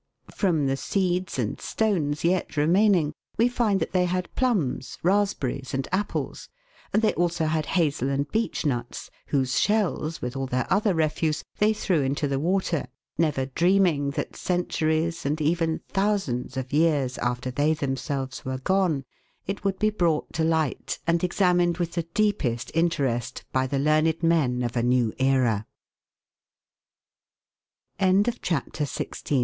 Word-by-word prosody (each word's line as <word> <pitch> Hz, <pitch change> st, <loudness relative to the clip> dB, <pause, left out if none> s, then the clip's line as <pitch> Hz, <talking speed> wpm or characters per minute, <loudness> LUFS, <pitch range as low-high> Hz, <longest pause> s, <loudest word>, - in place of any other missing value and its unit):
From 165 Hz, -8 st, +1 dB
the 135 Hz, 0 st, 0 dB
seeds 185 Hz, 0 st, -1 dB
and 115 Hz, -4 st, -2 dB
stones 165 Hz, -9 st, 0 dB
yet 170 Hz, -3 st, 0 dB
remaining, 175 Hz, 0 st, +3 dB, 0.2 s
we 230 Hz, -, +4 dB
find 235 Hz, -5 st, +1 dB
that -, -, -2 dB
they 180 Hz, -1 st, +2 dB
had 180 Hz, 0 st, -2 dB
plums, 195 Hz, -, 0 dB
raspberries, 170 Hz, -9 st, 0 dB
and 135 Hz, 0 st, -2 dB
apples; 200 Hz, +3 st, -2 dB, 0.4 s
and 215 Hz, -, +2 dB
they 215 Hz, -, +3 dB
also 170 Hz, -2 st, 0 dB
had 155 Hz, -1 st, 0 dB
hazel 145 Hz, -5 st, +1 dB
and 140 Hz, +1 st, 0 dB
beech 225 Hz, -6 st, -1 dB
nuts, 120 Hz, -4 st, -3 dB, 0.2 s
whose 130 Hz, -3 st, +1 dB
shells, 190 Hz, -6 st, 0 dB
with 125 Hz, +1 st, -4 dB
all 135 Hz, 0 st, -2 dB
their 125 Hz, -1 st, -1 dB
other 205 Hz, -1 st, +2 dB
refuse, 155 Hz, 0 st, 0 dB, 0.2 s
they 210 Hz, +1 st, +4 dB
threw 190 Hz, -7 st, +1 dB
into 140 Hz, +2 st, 0 dB
the 135 Hz, -1 st, -1 dB
water, 175 Hz, -2 st, 0 dB, 0.3 s
never 150 Hz, -5 st, +1 dB
dreaming 170 Hz, 0 st, +2 dB
that 140 Hz, -, -4 dB
cen 180 Hz, -1 st, 0 dB
turies 160 Hz, +1 st, -1 dB
and 150 Hz, +3 st, -1 dB
even 160 Hz, +1 st, 0 dB
thousands 195 Hz, -12 st, -1 dB
of 130 Hz, +1 st, -4 dB
years 145 Hz, -5 st, +2 dB
after 125 Hz, +1 st, -2 dB
they 145 Hz, +5 st, +2 dB
themselves 135 Hz, -1 st, -3 dB
were 130 Hz, 0 st, -3 dB
gone, 170 Hz, -2 st, +1 dB, 0.4 s
it 195 Hz, +1 st, -4 dB
would 195 Hz, -1 st, 0 dB
be 215 Hz, +1 st, +2 dB
brought 170 Hz, -7 st, 0 dB
to 160 Hz, -, 0 dB
light 160 Hz, -4 st, 0 dB
and 170 Hz, 0 st, +1 dB
examined 175 Hz, -2 st, +2 dB
with 170 Hz, -2 st, -2 dB
the 170 Hz, -1 st, -3 dB
deepest 145 Hz, -, 0 dB
interest 145 Hz, -8 st, 0 dB
by 130 Hz, 0 st, +1 dB
the 140 Hz, -, -1 dB
learned 155 Hz, +3 st, +3 dB
160 Hz, 135 wpm, -25 LUFS, 140-185 Hz, 0.4 s, we